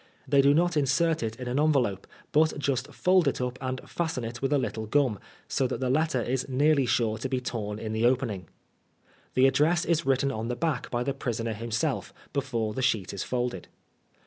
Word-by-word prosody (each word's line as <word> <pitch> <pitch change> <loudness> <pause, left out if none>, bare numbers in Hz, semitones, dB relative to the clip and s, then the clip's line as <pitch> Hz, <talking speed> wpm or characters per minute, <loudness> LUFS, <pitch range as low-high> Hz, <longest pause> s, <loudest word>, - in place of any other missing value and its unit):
They 140 +1 +5
do 140 +1 +5
not 175 +1 +2
insert 150 +3 +2
it 110 -1 -2
in 125 +1 -7
an 125 +3 0
envelope, 135 -11 +1 0.2
but 155 +1 +3
just 135 -2 -1
fold 180 -3 +3
it 140 - 0
up 125 0 -3
and 130 0 -2
fasten 160 -7 -2
it 115 +1 -6
with 135 +1 0
a 145 - +4
little 110 -4 -3
gum, 125 -4 +2 0.3
so 130 - +1
that - - -3
the 130 -1 0
letter 155 -2 +1
is 130 +2 -2
nearly 140 0 +3
sure 110 -2 +1
to 130 - -3
be 130 -1 0
torn 105 -4 -4
in 110 0 -4
the 110 +2 +3
opening. 120 -9 -1 0.9
The 130 - +5
address 150 +6 +3
is 170 -1 +1
written 135 0 +2
on 110 -2 -4
the 125 - -2
back 150 0 -1
by 120 0 -1
the 140 - -1
prisoner 115 -4 -3
himself, 115 +6 -2 0.2
before 120 -6 -1
the 130 - -3
sheet 110 -7 0
is 100 - -4
folded. 125 -7 -2
130 Hz, 205 wpm, -27 LUFS, 115-145 Hz, 0.9 s, They